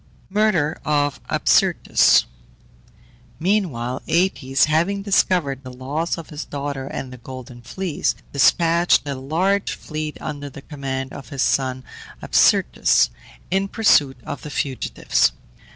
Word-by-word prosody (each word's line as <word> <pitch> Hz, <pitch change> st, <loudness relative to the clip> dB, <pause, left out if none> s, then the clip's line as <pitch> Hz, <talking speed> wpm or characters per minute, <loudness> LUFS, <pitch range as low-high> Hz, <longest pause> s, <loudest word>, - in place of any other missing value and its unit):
MURDER 190 Hz, -7 st, +1 dB
OF 145 Hz, -2 st, 0 dB
ABSYRTUS. -, -, +4 dB, 1.1 s
Meanwhile 160 Hz, -, -1 dB
Aëtes, 155 Hz, -6 st, +1 dB
having 170 Hz, +6 st, 0 dB
discovered 180 Hz, -9 st, +1 dB
the 130 Hz, -2 st, -9 dB
loss 140 Hz, +8 st, -3 dB
of 165 Hz, -, -9 dB
his 150 Hz, 0 st, -5 dB
daughter 140 Hz, -1 st, -5 dB
and 130 Hz, -2 st, -6 dB
the 125 Hz, -, -11 dB
Golden 125 Hz, 0 st, -10 dB
Fleece, 180 Hz, +5 st, -2 dB, 0.2 s
despatched 165 Hz, +3 st, +3 dB
a 140 Hz, -, -2 dB
large 170 Hz, +9 st, 0 dB
fleet, 155 Hz, -1 st, -5 dB
under 145 Hz, -2 st, -6 dB
the 135 Hz, 0 st, -12 dB
command 135 Hz, -3 st, -5 dB
of 135 Hz, -4 st, -10 dB
his 140 Hz, -2 st, -1 dB
son 130 Hz, -1 st, 0 dB, 0.4 s
Absyrtus, -, -, +3 dB, 0.4 s
in 195 Hz, +1 st, +1 dB
pursuit 145 Hz, -, +3 dB
of 145 Hz, -, -6 dB
the 150 Hz, -, -8 dB
fugitives. 135 Hz, -2 st, 0 dB
145 Hz, 120 wpm, -21 LUFS, 135-170 Hz, 1.1 s, ABSYRTUS